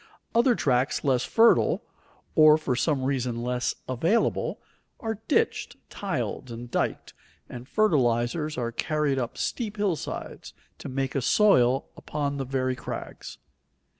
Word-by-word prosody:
Other 240 +1 +4
tracts 130 - +1
less 130 -3 +2
fertile, 230 +1 +4 0.5
or 155 -1 +7
for 140 -5 -1
some 135 +1 0
reason 125 -3 -1
less 125 0 -1
available, 160 - 0 0.4
are 225 -4 -4
ditched, 455 +9 0 0.2
tiled, 130 - -3
and 120 +1 -8
diked, - - -2 0.3
and 125 +1 -9
fertilizers 150 - +1
are 120 -1 -2
carried 150 +2 0
up 120 -1 -4
steep 215 -4 -3
hillsides 200 -6 -3 0.3
to - - -7
make 135 0 -2
a 135 - 0
soil 130 - +4
upon 145 -1 -3
the 135 - -3
very 130 0 -1
crags. 125 - -7
135 Hz, 130 wpm, -26 LUFS, 125-170 Hz, 0.5 s, or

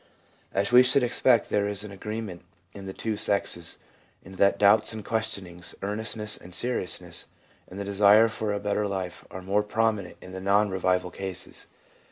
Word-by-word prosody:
As 100 +4 0
we 125 +1 +9
should 130 +1 +3
expect, 120 -1 +3
there 100 0 +2
is 105 0 -3
agree 105 +2 -5
ment 90 -6 -7 0.3
in 100 -1 -9
the - - -4
two 110 +3 -3
sexes 95 -5 -1 0.5
in 95 +1 -11
that 100 +1 +4
doubts 105 +2 +5
and 110 -2 -7
questionings, 95 -6 -3
earnestness 105 +1 -2
and 90 0 -10
seriousness, 90 -5 -2 0.4
and 95 - -9
the 100 - -3
desire 100 +2 +6
for 110 -1 -3
a 100 - -1
better 105 +1 0
life 95 -2 -4
are 95 - -8
more 100 +3 +2
prominent 105 -2 -1
in 95 - -11
the 95 0 -6
non 100 +1 +3
revival 90 -1 0
cases. 95 -2 -7
100 Hz, 175 wpm, -27 LUFS, 95-110 Hz, 0.5 s, we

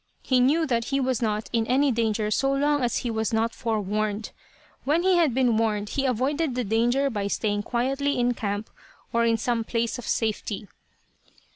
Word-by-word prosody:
He 255 -2 +2
knew 295 +6 +3
that 235 -5 0
he 275 +1 0
was 260 -3 0
not 215 -1 -1
in 225 -1 +1
any 270 +3 +3
danger 220 -2 0
so 270 +5 +2
long 290 +1 +1
as 240 -1 +1
he 235 - 0
was 220 +1 -1
not 225 +1 0
forewarned. 215 -1 -2 0.5
When 310 +5 +1
he 375 -1 +4
had 330 -5 +3
been 250 -4 +3
warned 210 -2 0
he 275 -1 0
avoided 265 +3 0
the 250 - 0
danger 240 +6 +2
by 205 -3 -2
staying 205 0 -1
quietly 270 +5 -1
in 245 0 +2
camp, 205 -1 -4 0.4
or 235 0 +3
in 230 -1 +3
some 235 0 -1
place 230 +2 -2
of 240 - -8
safety. 215 -2 -2
235 Hz, 185 wpm, -25 LUFS, 220-265 Hz, 0.5 s, he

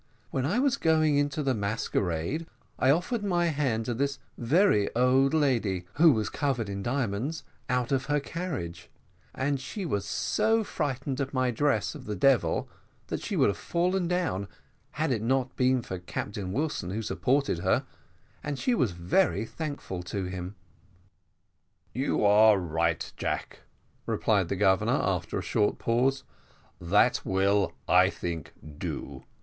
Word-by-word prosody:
"When 130 0 0
I 190 +9 0
was 265 0 +2
going 155 -2 +3
into 145 +1 -1
the 135 -2 +1
masquerade, 105 - -2 0.3
I 130 - +3
offered 180 - +1
to 200 -3 -1 0.2
hand 130 -7 0
this 140 +4 -1 0.2
very 125 - +3
old 130 +2 +4
lady, 115 - +1
who 160 +1 +6
was 110 -5 0
covered 130 -8 -1
with 100 0 -4
diamonds, 125 +5 -2 0.3
out 125 -1 0
of 135 -2 +1
her 145 0 +1
carriage, 140 - -5 0.5
and 140 +1 0
she 195 +8 -5
was 100 - -1
so 225 - +1
frightened 135 -6 -3
at 135 0 -4
my 130 -1 +2
dress 115 -4 +1
of - - -10
a 105 - -1
devil, 105 -5 +2 0.4
that - - -3
she - - -3
would - - +4
have 100 - -3
fallen 180 +1 0
down 165 - -1 0.5
had 155 0 -1
it 115 -4 0
not 130 +2 0
been 130 -1 +2
for 95 -3 -5
Captain 95 +2 -5
Wilson, 140 - -2
who 110 +4 -3
supported 130 -2 0
her, 95 +2 +1 0.6
and 145 -2 -3
she 250 - +1
was 130 - +1
very 90 +3 +1
thankful 145 - -5
to 95 +3 -4
him." 90 +1 -5 1.4
"You 130 -3 0
are 105 +1 +6
right, 85 -2 -1
Jack," - - -3 0.5
replied 100 -6 +1
the - - 0
Governor, 95 -1 +3
after - - -1
a - - -3
short 105 - +1
pause; 130 +4 +1 0.6
"that 85 - +3
will, 95 -1 +2
I 90 +1 +5
think, 85 -5 -5 0.3
do. 65 -1 -5
125 Hz, 150 wpm, -28 LUFS, 100-145 Hz, 1.4 s, who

